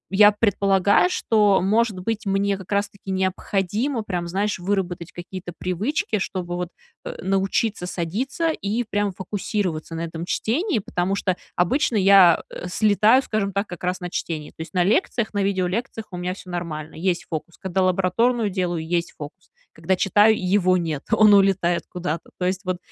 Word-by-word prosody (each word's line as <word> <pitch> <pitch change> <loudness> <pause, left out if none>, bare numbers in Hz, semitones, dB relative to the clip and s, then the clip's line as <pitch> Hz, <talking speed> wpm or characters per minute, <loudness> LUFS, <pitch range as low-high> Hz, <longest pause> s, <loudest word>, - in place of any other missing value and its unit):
я 210 +1 +8
предполагаю, 200 - +3
что, 210 - +3
может 210 0 +1
быть, 215 +1 -3
мне 195 +1 +1
как 190 +1 -12
раз 200 0 +1
таки 200 -1 -14
необходимо 195 +6 -1
прям, 175 -4 -3
знаешь, 195 +2 -1
выработать 180 -3 -2
какие-то 175 0 -8
привычки, 210 - -1
чтобы 180 -2 -3
вот, 180 -1 -3 0.3
э, - - -6
научиться 195 0 0
садиться 245 - -2
и 225 -3 -2
прям 205 -2 -1
фокусироваться 190 -4 -3
на 165 - -4
этом 165 0 -5
чтении, 290 - 0
потому 190 -1 -1
что 185 -2 0 0.2
обычно 245 - +1
я, 195 -4 +6
э, - - -6
слетаю, 215 +6 +4
скажем 200 -4 -2
так, 200 +2 0
как 180 -1 -10
раз 180 +1 -1
на 180 -1 -5
чтении, 155 -4 -4
то - - -40
есть 160 +2 -8
на 180 - +4
лекциях, 225 - +1
на 205 - 0
видеолекциях 200 +3 -1
у 180 - -6
меня 180 +1 -3
всё 185 -2 -11
нормально. 160 -3 -5
Есть 180 +1 -1
фокус. 165 +1 -6
Когда 190 0 -2
лабораторную 200 +5 +1
делаю, 175 -3 -2
есть 170 0 -1
фокус. 150 +5 -10 0.2
Когда 160 +4 0
читаю, 205 +4 +4
его 185 -1 +2
нет. 160 -5 -2
Он 215 -2 +6
улетает 190 -3 +3
куда-то. 170 -2 -4
То 180 - -2
есть 185 +1 -1
вот 185 -1 -1
190 Hz, 170 wpm, -23 LUFS, 180-210 Hz, 0.3 s, я